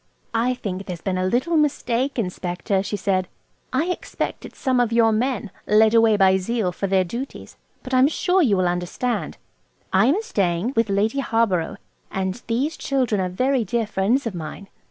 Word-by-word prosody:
"I 240 +3 +1
think 195 -5 -5
there's 180 -3 -5
been 185 +1 -2
a 185 - +1
little 260 - +1
mistake, 270 -3 +1
Inspector," 185 -1 -1
she 205 +1 -3
said 185 -1 0 0.4
"I 320 - +1
expect - - -4
it's - - -18
some 260 -3 +1
of 240 -2 +2
your 230 -1 +4
men–led 220 -2 +1
away 225 -2 +5
by 190 -1 +5
zeal 195 0 -1
for 195 +2 -3
their 190 -1 +3
duties. 235 +10 -7 0.3
But 255 - -7
I'm 255 +1 +6
sure 360 +4 +2
you'll 200 - +3
understand. 180 +8 -2 0.6
I 195 +5 +5
am 360 +12 +2
staying 190 - 0
with 230 -1 +2
Lady 210 +7 +1
Harborough, 225 -10 0 0.3
and 190 +4 -3
these 265 +7 -1
children 250 -7 0
are 185 - -1
very 255 +7 +1
dear 225 +3 -1
friends 215 +6 0
of 230 - -2
mine." 175 +4 -7
220 Hz, 175 wpm, -22 LUFS, 190-250 Hz, 0.6 s, I'm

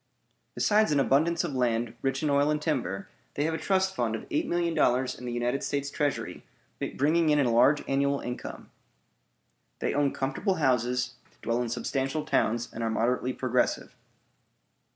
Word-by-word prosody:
Besides 215 -2 +3
an 145 - +3
abundance 160 +5 +2
of - - -3
land, 120 -2 0
rich 135 +2 -1
in 150 - +1
oil 140 +1 +3
and 150 0 +1
timber, 120 - -2 0.3
they 145 - 0
have 160 +1 0
a 160 - -2
trust 190 -1 +1
fund 115 -2 0
of - - -7
eight 310 0 0
million 170 -1 0
dollars 130 -4 +2
in 125 - -10
the 120 - -3
United 120 +3 -1
States 140 0 -2
Treasury, 145 -1 -2 0.5
bringing 155 +3 +2
in 150 - +4
a 125 -4 +2
large 135 +6 +4
annual 140 +1 +1
income. 125 0 -7 1.1
They - - -1
own 145 -1 +2
comfortable 145 +9 -1
houses, 125 -2 0 0.3
dwell 115 +1 0
in 120 - -2
substantial 135 +5 -2
towns, 120 -5 +1
and 115 - -6
are 115 - 0
moderately 125 +3 0
progressive. 125 -1 -1
135 Hz, 170 wpm, -28 LUFS, 125-150 Hz, 1.1 s, in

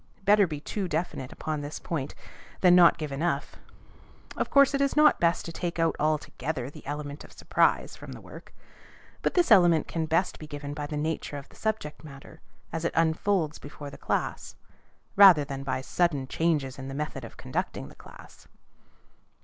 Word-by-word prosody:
Better 205 -1 +5
be 150 -3 -5
too 195 +5 -4
definite 155 -5 -3
upon 155 -1 -4
this 145 +1 -6
point, 150 -6 -4 0.5
than 180 -2 +6
not 175 -2 +8
to - - -25
give 155 -3 -5
enough. 160 +5 -2 0.8
Of - - -2
course, 280 0 +5
it 275 - +1
is 275 - +1
not 300 0 +5
best 170 0 +1
to 165 - -5
take 170 +1 -4
out 165 -1 +1
altogether 150 -3 -2
the - - -13
element 145 0 -5
of - - -15
surprise - - +1
from - - -10
the - - -10
work; - - -13 0.7
but - - -1
this 355 -2 +3
element 175 -4 +6
can 160 -2 -2
best 165 +4 0
be 155 - -9
given 145 -1 -6
by 145 0 -5
the 150 - -4
nature 155 -1 -3
of 140 - -10
the - - -19
subject 210 -10 -3
matter 145 +2 -12 0.3
as 165 0 -3
it 170 - -1
unfolds 165 0 +1
before 145 0 -9
the - - -10
class, - - -3 0.6
rather 185 -7 +8
than 135 -1 -6
by 130 -1 -2
sudden 145 -1 0
changes 145 -4 -1
in 135 - -6
the 135 - -6
method 150 -3 -4
of 115 - -10
conducting - - -4
the - - -14
class. - - -15
155 Hz, 190 wpm, -27 LUFS, 145-175 Hz, 0.8 s, not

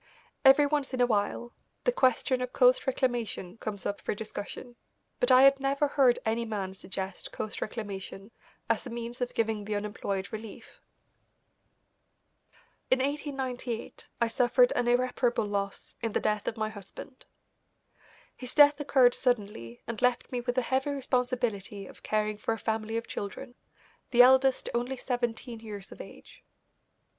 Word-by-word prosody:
Every 270 +2 +7
once 285 -2 -1
in - - -5
a - - +6
while 230 +1 -1 0.3
the - - +3
question 255 - +2
of 250 0 -4
coast 250 0 +4
reclamation 240 -6 -1
comes 205 -2 -4
up 205 - -3
for - - -2
discussion, 220 +3 -7 0.4
but 245 - +2
I 255 0 +7
had 275 0 +6
never 275 +1 +1
heard 260 -4 +4
any 225 +1 0
man 205 -4 -4
suggest 190 0 -6
coast 215 - -5
reclamation 200 -2 -6 0.4
as - - 0
a - - -6
means 235 +1 -6
of 245 - -2
giving 220 -2 0
the 210 +1 -3
unemployed 205 -1 -3
relief. 220 -1 -9 2.1
In 260 - +5
1898 265 -4 -4
I 235 - +3
suffered 250 - +3
an 240 - +1
irreparable 245 -1 +1
loss 200 -1 -3
in 225 -3 -2
the - - +2
death 210 -1 -1
of 225 - -2
my 215 0 -1
husband. 220 +5 -11 1.1
His 250 -1 -8
death 290 0 +7
occurred 260 -4 +4
suddenly 205 - -2
and 230 -2 -5
left 250 -1 +1
me 250 -1 -2
with 245 0 -2
the 255 - +2
heavy 265 +3 0
responsibility 245 -7 -1
of - - -14
caring 215 -1 -1
for 225 +1 -1
a - - -9
family 220 0 -2
of 230 - -3
children, 245 +5 -6 0.6
the 245 0 +7
eldest 260 +1 +4
only 245 +2 -1
seventeen 240 -2 -3
years 210 -3 -9
of - - -9
age. - - -14
240 Hz, 155 wpm, -29 LUFS, 215-260 Hz, 2.1 s, Every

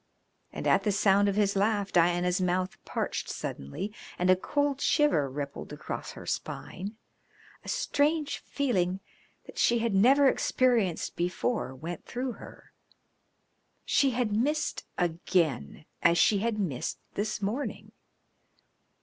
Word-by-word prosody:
And - - -6
at - - +4
the 210 - +1
sound 200 0 +4
of 195 - -1
his 205 -1 +2
laugh 205 0 +1
Diana's 175 +1 +3
mouth 185 0 0
parched - - -3
suddenly, 130 - -5 0.2
and 180 +1 +3
a - - +7
cold 285 +8 -1
shiver 225 - +3
rippled 140 +1 -6
across - - -6
her - - -10
spine. 200 +5 -5 0.7
A - - -8
strange 305 -10 +1
feeling 190 -10 0 0.5
that - - -9
she 235 - +4
had 230 -2 0
never 265 +8 +6
experienced 240 -9 +1
before 180 - -1
went 165 +5 -6
through 250 +1 -3
her. - - -13 1.1
She 275 - +3
had 240 -4 0
missed 295 +7 0
again 165 - 0 0.2
as 170 - +4
she 195 +4 +4
had 225 +1 -1
missed 165 -12 -2 0.2
this 215 +1 -2
morning. 215 +8 -3
200 Hz, 130 wpm, -29 LUFS, 175-245 Hz, 1.1 s, a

